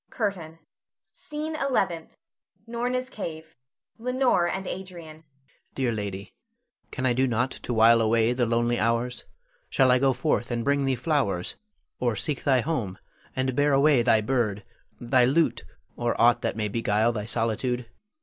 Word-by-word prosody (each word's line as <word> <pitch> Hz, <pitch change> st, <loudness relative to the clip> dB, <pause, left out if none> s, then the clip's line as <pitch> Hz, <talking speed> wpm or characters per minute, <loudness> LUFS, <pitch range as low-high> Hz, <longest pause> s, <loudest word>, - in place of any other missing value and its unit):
_ -, -, -46 dB
CURTAIN. 185 Hz, -8 st, -3 dB, 0.5 s
SCENE 305 Hz, +1 st, -5 dB
ELEVENTH. 190 Hz, -, -1 dB, 0.5 s
[Norna's 245 Hz, +2 st, -2 dB
cave. 160 Hz, -9 st, -7 dB, 0.4 s
Leonore 250 Hz, -6 st, +2 dB
and 190 Hz, +2 st, -3 dB
Adrian.] 190 Hz, -, -4 dB, 0.4 s
Adrian. 160 Hz, -, -23 dB, 0.5 s
Dear 130 Hz, -3 st, 0 dB
lady, 100 Hz, -2 st, -5 dB, 0.6 s
can 130 Hz, -, -4 dB
I 125 Hz, -, +3 dB
do 130 Hz, +2 st, +2 dB
nought 125 Hz, +2 st, 0 dB
to -, -, -7 dB
while 115 Hz, 0 st, +5 dB
away 115 Hz, +1 st, +2 dB
the 125 Hz, -1 st, 0 dB
lonely 120 Hz, +1 st, +1 dB
hours? 115 Hz, +2 st, -1 dB, 0.4 s
Shall 130 Hz, -1 st, +4 dB
I 125 Hz, -, +4 dB
go 135 Hz, 0 st, +3 dB
forth 130 Hz, -1 st, -1 dB
and 120 Hz, -1 st, -2 dB
bring 140 Hz, 0 st, +2 dB
thee 135 Hz, -1 st, +1 dB
flowers, 125 Hz, -, -1 dB, 0.5 s
or 120 Hz, -3 st, 0 dB
seek 145 Hz, +5 st, -2 dB
thy 130 Hz, -3 st, +3 dB
home 115 Hz, -, -3 dB, 0.4 s
and 130 Hz, -1 st, -1 dB
bear 145 Hz, +1 st, +3 dB
away 140 Hz, -1 st, +4 dB
thy 115 Hz, -2 st, +3 dB
bird, 110 Hz, -4 st, -1 dB, 0.4 s
thy 125 Hz, +1 st, +3 dB
lute, 150 Hz, +7 st, +2 dB, 0.3 s
or 120 Hz, -1 st, -2 dB
aught 120 Hz, 0 st, +5 dB
that -, -, -2 dB
may 105 Hz, -1 st, -1 dB
beguile 110 Hz, +1 st, +1 dB
thy 105 Hz, -3 st, -4 dB
solitude? 115 Hz, +2 st, -1 dB
125 Hz, 160 wpm, -26 LUFS, 115-160 Hz, 0.6 s, while